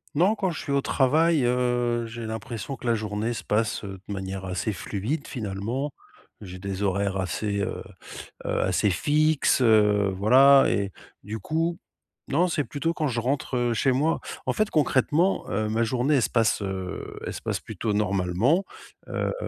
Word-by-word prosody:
Non, 190 +8 +4
quand 190 -4 -1
je 160 - -5
suis 140 - -5
au 140 0 +2
travail, 150 +3 +3
heu, 120 -1 +1
j'ai 115 0 -6
l'impression 115 +3 -5
que - - -12
la 120 - +3
journée 110 +1 -2
se - - -6
passe, 110 0 0
heu, 100 -1 -6
de 100 - -4
manière 95 0 -5
assez 90 +4 -2
fluide, 105 - -3
finalement. 115 +5 -3 0.5
J'ai 95 -2 -9
des 100 +1 -4
horaires 100 0 0
assez, 100 +2 -2
heu - - -3 0.6
heu, - - 0
assez 95 +2 +2
fixes, 150 - +2
heu, 105 -4 +4
voilà 135 +7 +6
et 100 -1 0 0.3
du 110 +2 -5
coup, 165 +4 -1 0.5
non, 170 +6 +2
c'est 155 -4 0
plutôt 165 +5 -2
quand 155 -4 -1
je 120 -2 -1
rentre, 130 +1 -1
heu, 120 -1 +1
chez 130 +4 +2
moi. 150 +6 +1 0.3
En - - +1
fait, 215 0 +1
concrètement, 155 +5 +2
heu, 110 +2 -1
ma 110 +2 0
journée, 130 +5 +1
elle 130 - +3
se - - +1
passe, 115 -3 +2
heu, 95 -1 -5
elle - - -4
se - - -7
passe - - -2
plutôt 110 -2 -3
normalement. 105 - +1 0.4
Heu, - - -2
115 Hz, 180 wpm, -25 LUFS, 100-140 Hz, 0.6 s, voilà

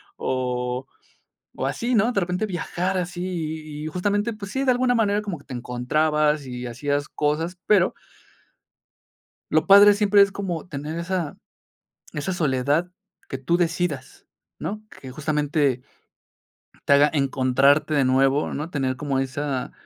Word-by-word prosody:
O 125 0 -2 0.7
o - - -2
así, 240 +2 -2
¿no? 225 +1 +3
De 205 - +1
repente 180 +3 -1
viajar 180 0 -2
así 180 0 -3
y 155 -4 -5
y - - -3
justamente, 205 +7 -1
pues 205 -2 -8
sí, 270 - -1
de 260 - +5
alguna 250 0 +2
manera 210 -2 +2
como 200 -5 -4
que 140 - -19
te - - -9
encontrabas 150 +4 0
y 125 0 -6
hacías 145 +4 -2
cosas, 160 +5 -1
pero 205 -4 +4 1.6
lo 155 +1 +2
padre 200 +1 +8
siempre 205 -1 +5
es 200 0 +2
como 185 -5 -4
tener 150 +1 -5
esa 170 -2 -3 0.8
esa 150 +5 -3
soledad 150 +1 0 0.4
que - - -4
tú 135 +6 +1
decidas, 165 -5 -2 0.3
¿no?, 215 +2 -5
que 130 - -11
justamente 145 -2 0 1.0
te - - +2
haga 145 +1 +6
encontrarte 140 +1 +2
de 140 -2 +3
nuevo, 135 +2 +2
¿no?, 150 +4 -4
tener 135 -5 -1
como 140 -1 -2
esa 135 0 -2
155 Hz, 145 wpm, -24 LUFS, 135-185 Hz, 1.6 s, padre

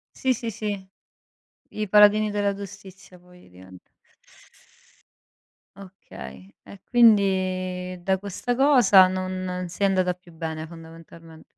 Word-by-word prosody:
Sì, 260 - 0
sì, 230 0 -5
sì. 205 -3 -5 0.8
I 215 -1 -5
paladini 210 +1 +5
della 205 -1 -1
giustizia 195 -2 -12
poi 180 - -20
divent 90 0 -16 1.9
Okay 100 - -13
e 200 - -15
quindi 185 -5 +1
da 190 0 0
questa 205 +5 -4
cosa 240 -9 +5
non 185 -1 -4
sei 195 +3 -1
andata 185 -2 +1
più 180 -1 -20
bene, 160 -1 -6
fondamentalmen 165 0 -14
185 Hz, 110 wpm, -24 LUFS, 175-205 Hz, 1.9 s, paladini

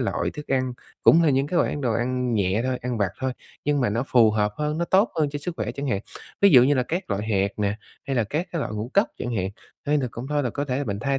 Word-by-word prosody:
loại - - -1
thức 150 - -8
ăn, 130 -2 0 0.3
cũng 170 - +6
là 155 - +4
những 135 +1 +2
cái 175 - -2
loại - - +2
ăn 145 - -4
đồ 120 -4 0
ăn 125 +1 -1
nhẹ 100 +2 +1
thôi, 130 -1 -1
ăn 125 -2 -2
vặt 100 -3 +1
thôi, 130 -1 -1 0.3
nhưng 145 -1 +1
mà 120 - +1
nó 115 +5 -1
phù 115 -4 +5
hợp 105 -1 0
hơn, 150 +1 -2
nó 170 - +1
tốt 190 +6 +3
hơn 145 -2 +2
cho 145 - -4
sức 170 +3 -5
khỏe 110 +1 -3
chẳng 140 +2 -5
hạn. 100 -5 0 0.4
Ví 200 - +7
dụ 125 -6 +8
như 145 +3 +4
là 125 - +2
các 170 - -4
loại 100 +2 -1
hạt 100 -2 +2
nè, 105 0 0 0.3
hay 135 -2 -1
là 115 - +2
các 155 - -2
cái 165 - -1
loại 110 - -3
ngũ 110 +4 -4
cốc 200 - +4
chẳng 120 -1 -3
hạn, 95 0 0 0.4
hay 150 0 +3
là 130 - -1
cũng 120 +3 -7
thôi 145 -1 +1
là 125 - -1
có 145 +4 -3
thể 140 +1 -2
mình 100 -3 -3
thay 135 +3 0
130 Hz, 300 wpm, -24 LUFS, 110-145 Hz, 0.4 s, dụ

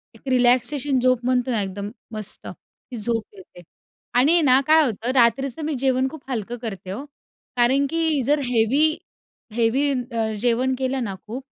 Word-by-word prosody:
एक - - -18
रिलॅक्सेशन 255 +2 +3
झोप 255 -1 +3
म्हणतो 255 0 +1
ना, 225 -3 +1
एकदम 200 +1 -5 0.3
मस्त 215 -1 -6
ही 250 - -12
झोप 225 0 -1
येते. 365 - -15 0.5
आणि 260 +6 +5
आहे 345 - +4
ना, 260 -3 +5
काय 315 0 +6
होतं, 235 +1 -2
रात्रीचं 255 +4 +2
मी 310 - -2
जेवण 260 -1 +1
खूप 310 0 -11
हलकं 235 0 -3
करते 195 -5 -6
ओ. 255 - -6 0.5
कारण 260 +4 +3
की 320 -3 +1
जर 295 +3 +2
हेवी, 250 +7 +2 0.6
हेवी 240 +5 +1
अ, 240 -3 -2
जेवण 250 +2 +1
केलं 260 0 -1
ना 200 -4 -4
खूप, 250 +5 -6
255 Hz, 165 wpm, -22 LUFS, 230-275 Hz, 0.6 s, काय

